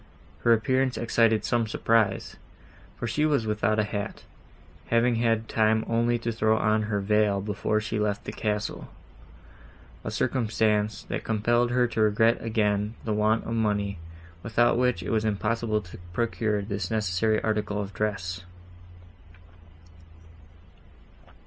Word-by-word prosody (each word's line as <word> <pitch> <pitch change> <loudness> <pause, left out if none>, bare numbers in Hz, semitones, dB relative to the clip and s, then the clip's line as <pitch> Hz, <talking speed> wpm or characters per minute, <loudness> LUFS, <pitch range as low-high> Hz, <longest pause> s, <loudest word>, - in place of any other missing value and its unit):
Her 115 - +2
appearance 130 +3 +2
excited 115 -1 +2
some 120 -2 +1
surprise, 115 -1 +1 0.6
for - - -4
she 120 +7 0
was 145 -7 +2
without 110 0 0
a 105 - +3
hat, 100 0 -5 0.6
having 115 0 +2
had 115 -1 +1
time 110 0 +2
only 120 +1 +1
to 115 0 -3
throw 110 0 +2
on 110 0 +2
her 105 -2 0
veil 105 0 +2
before 105 +1 -1
she 110 0 -3
left 105 0 -1
the - - -4
castle, 105 -1 -3 1.1
a - - -3
circumstance, 110 -2 0
that - - -4
compelled 120 +2 +1
her 125 0 +2
to 110 - -1
regret 110 +2 +3
again 105 -1 0
the 110 - 0
want 110 +2 +1
of 115 - -3
money, 105 -4 0 0.4
without 115 +3 +2
which 125 0 +1
it - - -4
was 110 -1 +1
impossible 110 +1 0
to 90 -2 -12
procure 110 -1 -1
this 100 -3 -3
necessary 110 0 +1
article 105 -1 -1
of 100 -1 -5
dress. 90 -3 -3
110 Hz, 135 wpm, -26 LUFS, 105-115 Hz, 1.1 s, a